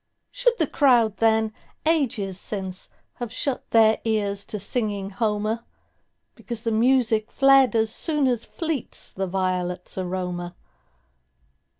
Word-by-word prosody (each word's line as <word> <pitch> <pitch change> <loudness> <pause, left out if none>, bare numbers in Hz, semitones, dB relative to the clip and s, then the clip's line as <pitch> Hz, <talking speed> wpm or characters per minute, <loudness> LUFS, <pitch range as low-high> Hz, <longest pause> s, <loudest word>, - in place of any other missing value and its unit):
Should - - +1
the 320 - +2
crowd 240 -7 +3
then, 220 -1 +2 0.3
ages 230 - 0
since, 190 -3 -3 0.3
Have 240 -2 -5
shut 255 +2 -3
their 220 -1 +4
ears 205 -3 0
to 210 - -3
singing 205 -2 -1
Homer, 215 +2 -1 0.7
Because 235 -2 -6
the 230 - 0
music 225 -1 +2
fled 270 -2 +5
as 220 -1 +2
soonAs 265 -7 +1
fleets 320 -7 -3
the 190 0 -3
violets' 180 0 -2
aroma? 180 -1 -4
220 Hz, 115 wpm, -24 LUFS, 195-250 Hz, 0.7 s, fled